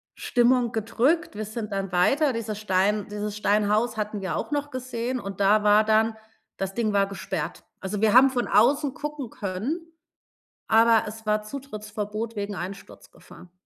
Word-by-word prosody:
Stimmung 245 -1 +2
gedrückt. 255 +9 0
Wir 215 0 -4
sind 215 0 -6
dann 195 -1 -3
weiter, 270 - +3
dieses 220 -2 -4
Stein 205 +1 +1
dieses 210 0 -4
Steinhaus 210 +3 +1
hatten 210 -1 -3
wir 190 - -2
auch - - -3
noch 290 0 -2
gesehen 255 -1 -3
und 195 -3 -7
da 210 +2 +4
war 210 +1 +5
dann 220 +1 +2 0.4
das 195 0 -3
Ding 230 -3 0
war 200 -1 +3
gesperrt. 170 -4 -5 0.2
Also, 195 +2 -4
wir 220 0 +4
haben 265 +2 +8
von 245 -2 -1
außen 275 +5 +3
gucken 295 -5 -5
können, 205 - -3 0.9
aber 225 0 +5
es 220 +1 -8
war 210 0 +1
Zutrittsverbot 215 -2 -6
wegen 205 0 -3
Einsturzgefahr. 180 -1 -10
215 Hz, 160 wpm, -25 LUFS, 205-240 Hz, 0.9 s, haben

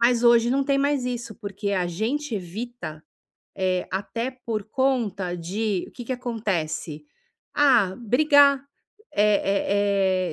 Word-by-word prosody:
Mas 235 0 +3
hoje 235 0 +5
não 275 +2 +2
tem 275 0 +2
mais 280 -2 +1
isso, 240 -3 -4
porque 200 -1 -4
a 180 -2 +1
gente 230 - -2
evita, 195 -3 -6 0.5
eh, 185 -1 0
até 230 +6 -3
por 220 -3 -2
conta 220 -8 0
de 190 +3 -2
o - - -24
que 245 - -9
que 260 - -2
acontece? 180 -11 -3 0.5
Ah, 245 -10 +4
brigar, 280 +3 +4 0.5
eh 200 -3 +2
220 Hz, 130 wpm, -24 LUFS, 190-250 Hz, 0.5 s, hoje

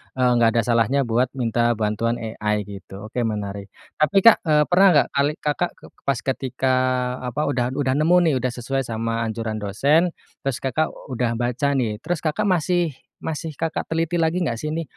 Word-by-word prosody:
eee, 125 -1 +3
nggak 115 -1 +4
ada 115 - +4
salahnya 120 +4 +2
buat 120 +2 +1
minta 120 -1 +1
bantuan 110 +2 0 0.2
AI 105 0 0
gitu, 100 0 -10
oke, 125 - -3
menarik. 100 -2 -4 0.3
Tapi 155 +5 +2
Kak, 230 - +8
eee, 150 -1 +5
pernah 195 +2 +6
enggak 145 - +4
kali 140 +2 +2
Kakak 150 +4 -1
ke - - -17 0.2
pas 135 -3 +1
ketika, 130 0 -1 0.5
apa, 125 +4 -3
udah 125 0 -1
udah 135 -2 +1
nemu 165 +4 +4 0.2
nih - - 0
udah 125 0 -1
sesuai 130 +3 -3
sama 115 0 -2
anjuran 110 -1 -3
dosen, 140 - +2 0.3
terus 135 -2 -3
Kakak 135 +4 +1 0.2
udah 120 -1 -1
baca 125 +4 -1
nih, 110 -5 -1
terus 175 +3 -3
Kakak 180 +7 0
masih 175 -4 +1 0.2
masih 160 0 -4
Kakak 165 -1 -2
teliti 165 +1 0
lagi 165 +2 +1
nggak 120 - -1
sih 155 0 -3
ini, 165 - -2
130 Hz, 185 wpm, -22 LUFS, 115-155 Hz, 0.5 s, Kak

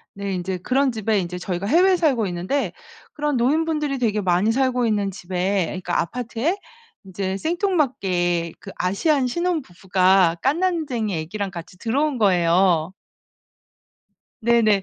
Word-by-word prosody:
네 200 -1 -3
인제 185 +1 -3
그런 260 +7 +1
집에 220 -1 0
인제 180 0 -5
저희가 180 +1 -3
해외에 365 - +4
살고 275 - +1
있는데 185 +5 -2 0.4
그런 295 -3 -1
노인분들이 300 +2 +1
되게 215 -4 +1
많이 190 +3 +2
살고 255 -1 +1
있는 205 -3 0
집에 185 +1 -1
그러니까 180 -2 -2
아파트에 245 - -2 0.5
인제 190 0 -3
생뚱맞게 240 - 0
그 195 - -9
아시안 255 - +1
신혼부부가 190 - +2
갓난쟁이 280 - 0
아기랑 195 +5 -4
같이 175 0 -10
들어온 270 +6 0
거예요. 180 -3 +3 1.5
네네 220 -3 +3
210 Hz, 310 characters per minute, -22 LUFS, 185-275 Hz, 1.5 s, 해외에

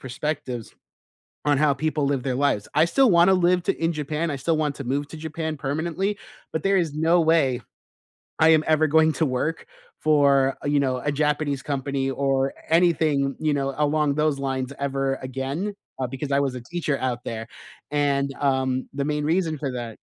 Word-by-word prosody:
perspectives 135 -3 -4 0.7
on 145 -2 +3
how 150 -1 +3
people 155 +1 -1
live 140 -2 0
their 130 -2 -1
lives. 135 -7 +1
I 155 +2 +5
still 260 +9 +4
wanna 175 +2 +6
live 180 -1 +3
t - - +2
in 165 +1 -1
Japan, 155 +2 -2
I 140 - -3
still 160 +5 0
want 150 -2 -1
to 140 - -6
move 140 +3 -1
to 160 - -9
Japan 160 0 -4
permanently, 170 +8 -2 0.4
but 160 - -2
there 195 0 +3
is 165 -5 0
no 165 +3 +3
way 155 -6 +2 0.8
I 160 - +6
am 155 -1 +5
ever 155 0 +4
going 160 +1 +4
to 160 - +1
work 135 +5 -2 0.3
for, 140 -3 +3
you 145 0 +2
know, 130 -2 0
a 145 +3 -2
Japanese 145 -1 0
company 140 -1 -2
or 135 0 0 0.2
anything, 155 -5 +2
you 155 -1 +1
know, 135 -1 -1
along 150 -1 +1
those 150 -2 +1
lines 135 0 -2
ever 135 -1 -1
again, 135 +10 -3 0.3
uh, 130 - -1
because 135 +3 -5
I 140 - +3
was 135 -2 -1
a 125 - -6
teacher 155 +1 -2
out 125 -1 -2
there, 110 -1 -5 0.4
and, 140 -1 +1
um, 130 -2 0
the 140 0 -2
main 150 0 -1
reason 165 -1 +1
for 140 -2 -2
that 120 -3 -6
145 Hz, 190 wpm, -24 LUFS, 135-160 Hz, 0.8 s, wanna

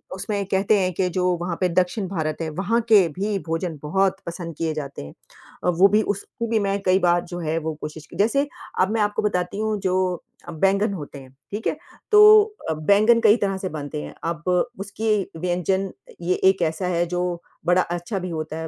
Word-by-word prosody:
उसमें 200 +1 -3
कहते 195 +2 +2
हैं 185 -1 0
कि 185 +1 0
जो 180 +1 0
वहाँ 175 -1 -2
पे 185 - +3
दक्षिण 185 +4 0
भारत 160 -5 -2
है 160 - -2
वहाँ 195 +9 0
के 200 -5 +7
भी 205 0 0
भोजन 165 0 -2
बहुत 190 +5 +1
पसंद 170 -1 -6
किए 160 -1 -1
जाते 145 -2 -6
हैं 70 - -10 0.5
अ, - - +2
वो 180 +3 +5
भी 210 +2 +3
उस 205 -2 -2 0.2
को 230 - -1
भी 225 -1 +2
मैं 200 0 0
कई 185 0 +3
बार 175 -1 +3
जो 175 0 -6
है 160 -1 -1
वो 160 -1 -2
कोशिश 150 0 -7
की - - -14
जैसे 255 +8 +2 0.3
अब 190 +2 +3
मैं 225 0 +1
आपको 210 0 0
बताती 180 -2 -1
हूँ 215 -1 0
जो 185 -2 0 0.2
अ, - - -6
बैंगन 195 +5 +1
होते 145 -5 -7
हैं, 130 -1 -14 0.2
ठीक 210 +2 -3
है? - - -1 0.3
तो 425 0 +9 0.3
अ, - - +1
बैंगन 205 +9 +4
कई 215 -2 +6
तरह 195 -2 -1
से 190 -1 -4
बनते 150 -1 -5
हैं, - - -8
अब 165 -1 -3 0.4
उसकी 205 +3 -3 0.3
व्यंजन 180 +2 0
अ, - - -16
ये 180 +2 +1
एक 190 -1 0
ऐसा 165 +3 -1
है 175 -1 +1
जो 175 0 -2 0.2
बड़ा 180 +1 +4
अच्छा 175 +4 -3
भी 185 0 -5
होता 155 -1 -4
है, 160 0 -4
185 Hz, 220 wpm, -23 LUFS, 165-200 Hz, 0.5 s, तो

